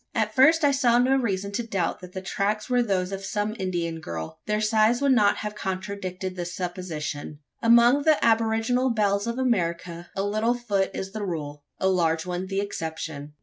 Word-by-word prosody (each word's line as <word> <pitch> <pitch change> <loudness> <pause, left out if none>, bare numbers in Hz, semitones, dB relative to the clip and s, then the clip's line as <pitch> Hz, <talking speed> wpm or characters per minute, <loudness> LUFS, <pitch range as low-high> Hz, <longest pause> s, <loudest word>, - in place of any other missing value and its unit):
At 215 -1 0
first, 310 +6 +5
I 285 - +5
saw 250 -4 +3
no 255 +2 +4
reason 200 -6 -1
to 205 - -1
doubt 200 -7 -2
that 180 0 -11
the 190 - -6
tracks 205 +2 -1
were 245 0 +4
those 190 -5 0
of 195 0 -5
some 210 +2 -2
Indian 170 -3 -2
girl. 80 - -6
Their 210 0 +1
size 215 +2 +3
would 280 -1 +2
not 210 -5 +4
have 210 -1 -4
contradicted 190 -1 -4
the 175 - -3
supposition. 175 -5 -5 0.2
Among 235 +4 +6
the 310 0 +4
aboriginal 225 +3 +2
belles 205 -2 +1
of 235 +1 -2
America, 175 -8 -1
a 195 - -1
little 215 +4 +1
foot 205 -5 0
is 190 0 -4
the 215 0 -5
rule 150 -6 -5
a 190 - +1
large 165 -3 +1
one 180 +1 -3
the 195 +1 -1
exception. 160 -6 -5
200 Hz, 190 wpm, -25 LUFS, 180-230 Hz, 0.2 s, Among